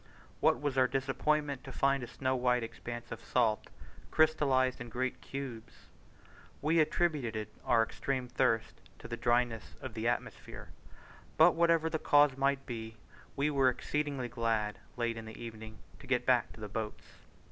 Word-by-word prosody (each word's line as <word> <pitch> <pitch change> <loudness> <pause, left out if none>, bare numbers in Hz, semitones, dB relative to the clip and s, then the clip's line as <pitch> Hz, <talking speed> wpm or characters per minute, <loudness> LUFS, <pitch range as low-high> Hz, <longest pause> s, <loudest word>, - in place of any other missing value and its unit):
What - - +3
was 145 -2 0
our 130 - +5
disappointment 140 +2 0
to 135 - -8
find 140 +1 +2
a 120 - -5
snow 130 +1 -1
white 125 -1 +2
expanse 120 +1 -7
of 115 0 -7
salt, 115 -4 +1 0.4
crystallized 135 -5 +3
in 120 - -6
great 130 +2 -2
cubes! 125 -4 -8 0.7
We 160 +3 +2
attributed 140 -10 0
our 115 -2 +4
extreme 130 +2 -3
thirst 120 -3 0 0.2
to - - -10
the 120 - -4
dryness 120 -2 0
of - - -7
the - - -2
atmosphere; - - -4 0.7
but 160 +3 +8
whatever 165 -1 +3
the 160 -1 -1
cause 145 -2 +5
might 135 0 +1
be, 115 -3 -6 0.4
we 145 +2 +1
were 135 -2 +4
exceedingly 140 0 -2
glad 115 -3 -1 0.2
late 120 -1 -1
in 115 - -7
the 110 - -10
evening 110 -1 -8 0.2
to - - -13
get - - +1
back - - +3
to - - -14
the 105 - -5
boats. 105 +1 -5
130 Hz, 160 wpm, -32 LUFS, 115-140 Hz, 0.7 s, but